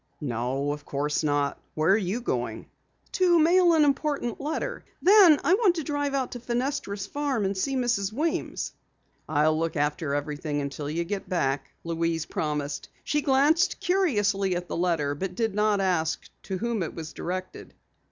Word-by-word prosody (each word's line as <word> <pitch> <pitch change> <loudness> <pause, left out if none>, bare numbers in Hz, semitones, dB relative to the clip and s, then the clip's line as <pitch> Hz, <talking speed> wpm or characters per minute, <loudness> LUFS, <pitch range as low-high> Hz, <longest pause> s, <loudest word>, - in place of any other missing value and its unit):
"No, 135 +2 -2
of 145 0 -5
course 145 +2 -1
not. 145 -1 0 0.2
Where 155 +3 +3
are - - +6
you 210 +3 -1
going?" 240 - -3 0.5
"To 360 -2 +4
mail 345 +2 +5
an 310 - +5
important 280 -4 -1
letter. 320 - -3 0.2
Then 370 -5 +7
I 350 - +4
want 395 -4 +4
to 325 - -2
drive 290 -1 -1
out 265 -2 -1
to 245 - -6
Fenestra's 240 -4 -2
farm 275 -2 -1
and 195 +1 -1
see 270 +9 -1
Mrs. 235 -6 0
Weems." 310 +8 -2 0.6
"I'll 155 +1 +3
look 165 0 -1
after 145 0 0
everything 145 0 -3
until 145 +1 -4
you 165 +3 -1
get 195 +3 -5
back," 135 -6 0
Louise 165 -1 -1
promised. 150 -2 -3
She 295 - 0
glanced 300 +6 +3
curiously 205 - +1
at 175 0 -4
the - - -4
letter 165 -5 +1
but 180 +5 -4
did 225 -1 0
not 210 0 +2
ask 175 -4 0
to 190 - -4
whom 235 0 -1
it 165 - -4
was 160 -2 -7
directed. 185 +1 -6
195 Hz, 170 wpm, -26 LUFS, -, 0.6 s, Then